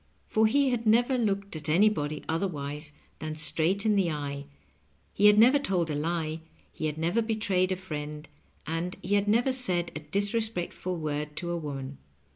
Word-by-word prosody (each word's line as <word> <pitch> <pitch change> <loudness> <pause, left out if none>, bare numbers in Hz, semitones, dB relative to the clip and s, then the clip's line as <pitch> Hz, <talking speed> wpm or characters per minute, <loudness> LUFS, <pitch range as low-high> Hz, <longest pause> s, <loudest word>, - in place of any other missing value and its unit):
For 220 0 +3
he 275 +3 +3
had 235 -2 -1
never 240 +4 +4
looked 200 -5 -1
at 155 0 -5
anybody 155 -4 +2
otherwise 150 -4 -2 0.3
than 155 0 -4
straight 160 +6 +1
in 215 -1 +3
the 190 -4 +2
eye, 140 -2 -4 0.7
he 205 - +5
had 210 0 +6
never 250 +6 +7
told 180 - 0
a - - -1
lie, 160 +1 -2 0.3
he 155 - -3
had 150 0 -4
never 170 +8 +1
betrayed 210 -5 0
a - - +1
friend, 150 -4 -6 0.4
and 165 +3 -3
he 190 - -1
had 205 0 +2
never 235 +5 +3
said 180 -9 +1
a - - -3
disrespectful 195 +1 -1
word 150 -1 -3
to 175 +1 -3
a - - -1
woman. 140 -3 -6
175 Hz, 175 wpm, -28 LUFS, 155-210 Hz, 0.7 s, never